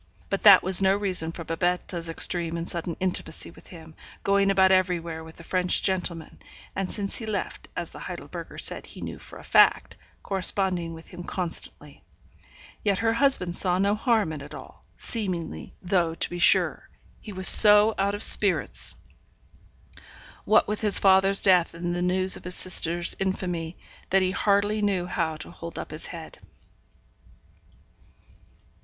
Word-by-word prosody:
But 195 Hz, -, -2 dB
that 200 Hz, -3 st, +7 dB
was 190 Hz, 0 st, +3 dB
no 190 Hz, 0 st, +2 dB
reason 185 Hz, -5 st, 0 dB
for 165 Hz, -, -9 dB
Babette's 170 Hz, 0 st, -3 dB
extreme 170 Hz, 0 st, 0 dB
and 165 Hz, +1 st, -6 dB
sudden 170 Hz, -1 st, -5 dB
intimacy 180 Hz, -3 st, -3 dB
with -, -, -19 dB
him, 160 Hz, -2 st, -14 dB, 0.3 s
going 200 Hz, 0 st, +1 dB
about 190 Hz, -1 st, +3 dB
everywhere 170 Hz, -3 st, -1 dB
with 160 Hz, 0 st, -14 dB
the 170 Hz, -, -14 dB
French 180 Hz, +1 st, -1 dB
gentleman; 180 Hz, -4 st, -3 dB, 0.4 s
and 190 Hz, -1 st, -4 dB
since 200 Hz, -2 st, -3 dB
he 225 Hz, -, -7 dB
left 210 Hz, -2 st, -5 dB
(as -, -, -6 dB
the -, -, -12 dB
Heidelberger -, -, -9 dB
said -, -, +3 dB
he -, -, -13 dB
knew -, -, -8 dB
for -, -, -14 dB
a -, -, -14 dB
fact) -, -, +2 dB, 0.3 s
corresponding 185 Hz, -3 st, 0 dB
with 160 Hz, -, -15 dB
him 175 Hz, -1 st, -10 dB
constantly. 175 Hz, -2 st, -4 dB, 0.8 s
Yet 200 Hz, -2 st, 0 dB
her 225 Hz, +2 st, 0 dB
husband 230 Hz, -9 st, +3 dB
saw 180 Hz, -1 st, +3 dB
no 200 Hz, +2 st, +1 dB
harm 215 Hz, -, 0 dB
in 150 Hz, -, -8 dB
it 140 Hz, -, -11 dB
all, -, -, -14 dB
seemingly; 175 Hz, -, -4 dB
though, 175 Hz, -3 st, -1 dB
to -, -, 0 dB
be 175 Hz, -, -6 dB
sure, 175 Hz, -, +2 dB, 0.3 s
he 215 Hz, -, -11 dB
was 185 Hz, -1 st, +2 dB
so 210 Hz, +1 st, +8 dB
out 200 Hz, +1 st, 0 dB
of 205 Hz, -, -3 dB
spirits, 200 Hz, -3 st, +3 dB, 1.5 s
what 215 Hz, -, +3 dB
with 210 Hz, +1 st, -4 dB
his 210 Hz, -2 st, +5 dB
father's 195 Hz, 0 st, +3 dB
death 180 Hz, -3 st, +3 dB
and 175 Hz, +1 st, -4 dB
the 175 Hz, -, -3 dB
news 185 Hz, +1 st, +2 dB
of -, -, -10 dB
his 180 Hz, 0 st, -3 dB
sister's 175 Hz, -1 st, +1 dB
infamy, 180 Hz, -3 st, -4 dB, 0.3 s
that 190 Hz, 0 st, +2 dB
he 185 Hz, -, -1 dB
hardly 205 Hz, +2 st, 0 dB
knew 195 Hz, -4 st, -1 dB
how 165 Hz, -3 st, -3 dB
to 155 Hz, -, -9 dB
hold 170 Hz, -1 st, -10 dB
up -, -, -7 dB
his -, -, -4 dB
head. -, -, -11 dB
185 Hz, 165 wpm, -24 LUFS, 170-195 Hz, 1.5 s, so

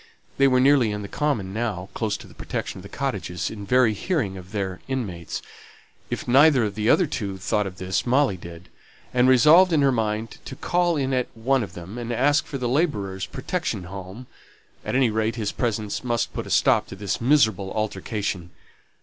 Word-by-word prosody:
They 140 Hz, -, +6 dB
were 130 Hz, -1 st, +4 dB
nearly 130 Hz, -4 st, +4 dB
on 105 Hz, 0 st, -4 dB
the -, -, -6 dB
common 110 Hz, -8 st, -1 dB
now, 105 Hz, -5 st, -3 dB
close 105 Hz, -3 st, -1 dB
to -, -, -12 dB
the -, -, -15 dB
protection -, -, -5 dB
of -, -, -10 dB
the -, -, -11 dB
cottages, 90 Hz, 0 st, -3 dB
in 100 Hz, -2 st, -8 dB
very 125 Hz, -2 st, +4 dB
hearing 110 Hz, -, -1 dB
of 90 Hz, 0 st, -11 dB
their 95 Hz, -3 st, -3 dB
inmates; 100 Hz, -11 st, -4 dB, 0.7 s
if -, -, -4 dB
neither 135 Hz, 0 st, +6 dB
of 105 Hz, -2 st, -1 dB
the 110 Hz, +2 st, 0 dB
other 185 Hz, -, +5 dB
two 100 Hz, -9 st, -4 dB
thought 105 Hz, +2 st, 0 dB
of 90 Hz, -2 st, -9 dB
this, 95 Hz, +1 st, -1 dB
Molly 130 Hz, -4 st, +2 dB
did, 85 Hz, 0 st, -11 dB, 0.4 s
and 125 Hz, 0 st, +4 dB
resolved 155 Hz, +8 st, +7 dB
in 155 Hz, -3 st, +3 dB
her 135 Hz, -, +4 dB
mind 110 Hz, -1 st, -2 dB
to 130 Hz, -, -7 dB
call 175 Hz, +2 st, +1 dB
in 135 Hz, -1 st, -1 dB
at 125 Hz, -1 st, +1 dB
one 130 Hz, +3 st, +2 dB
of 105 Hz, -, -5 dB
them, 95 Hz, +7 st, -8 dB
and 120 Hz, 0 st, -4 dB
ask 140 Hz, +5 st, +2 dB
for 140 Hz, -, -4 dB
the 125 Hz, -2 st, -2 dB
labourer's 105 Hz, -, -1 dB
protection 85 Hz, +4 st, -3 dB
home; 95 Hz, +6 st, -8 dB, 0.6 s
at -, -, -3 dB
any 130 Hz, -4 st, +3 dB
rate 110 Hz, +1 st, 0 dB
his 110 Hz, -3 st, -2 dB
presence 110 Hz, -3 st, -2 dB
must 120 Hz, -2 st, -1 dB
put -, -, -4 dB
a -, -, -8 dB
stop -, -, +3 dB
to -, -, -8 dB
this 100 Hz, +2 st, -3 dB
miserable 110 Hz, -8 st, +3 dB
altercation. 100 Hz, -3 st, -3 dB
110 Hz, 200 wpm, -24 LUFS, 95-130 Hz, 0.7 s, resolved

